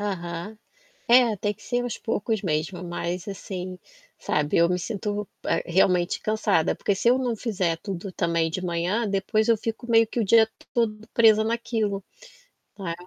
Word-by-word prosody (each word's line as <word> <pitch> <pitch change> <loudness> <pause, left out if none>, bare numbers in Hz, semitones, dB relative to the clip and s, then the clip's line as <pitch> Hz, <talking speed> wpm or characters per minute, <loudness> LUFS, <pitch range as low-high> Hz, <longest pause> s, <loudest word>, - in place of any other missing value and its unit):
Aham. 185 0 -4 0.5
É, 240 -2 +6
tem 205 +2 -1
que 210 - -23
ser 245 0 -1
aos 245 -2 -3
poucos 220 -1 -2
mesmo, 170 +1 -2
mas 175 +1 -4
assim, 185 -2 -6 0.4
sabe, 150 0 0
eu 170 0 +5
me 180 0 0
sinto, 205 +1 -3 0.2
eh, - - +1
realmente 180 0 +2
cansada 215 -6 +1
porque 200 - 0
se 235 +5 +2
eu 250 - +4
não 250 -3 -1
fizer 190 -7 -1
tudo 195 0 -5
também 170 -2 0
de 185 +3 -4
manhã, 180 +7 0
depois 215 +3 0
eu 230 - +5
fico 225 +3 -4
meio 225 0 +5
que 235 - -3
o - - +2
dia 220 +2 +5 0.2
todo 220 -2 0
presa 220 -2 +6
naquilo, 225 -3 -1 0.8
né. 185 -4 -3
205 Hz, 170 wpm, -25 LUFS, 180-225 Hz, 0.8 s, É